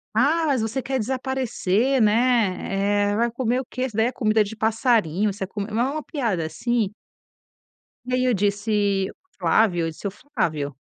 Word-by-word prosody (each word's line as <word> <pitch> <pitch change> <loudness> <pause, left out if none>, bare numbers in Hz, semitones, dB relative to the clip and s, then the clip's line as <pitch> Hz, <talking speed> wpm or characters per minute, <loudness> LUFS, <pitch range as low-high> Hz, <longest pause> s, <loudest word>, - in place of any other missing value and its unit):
"Ah, 305 +8 +3
mas 270 -5 +1
você 225 +4 -2
quer 265 +1 -2
desaparecer, 260 -1 0
né? 205 -3 +2
Eh, - - 0
vai 235 +2 +1
comer 245 +1 0
o - - -10
quê? 255 +1 -2
Isso 240 -5 -6
daí 225 +1 +3
é - - -1
comida 220 -3 +2
de 210 +2 -7
passarinho, 220 - +1
você 195 - -5
é - - -13
com", 205 +2 -5
mas 235 +4 +1
é - - -2
uma 305 +1 -4
piada 225 - -2
assim 215 +6 -1 1.1
e 250 - -4
aí 255 0 +1
eu 250 - +3
disse: 205 -1 +1 0.3
"Flávio", 175 0 +3
eu - - -1
disse: 160 +5 -6
"O - - -4
Flávio" 160 - -3
220 Hz, 185 wpm, -23 LUFS, 200-255 Hz, 1.1 s, Ah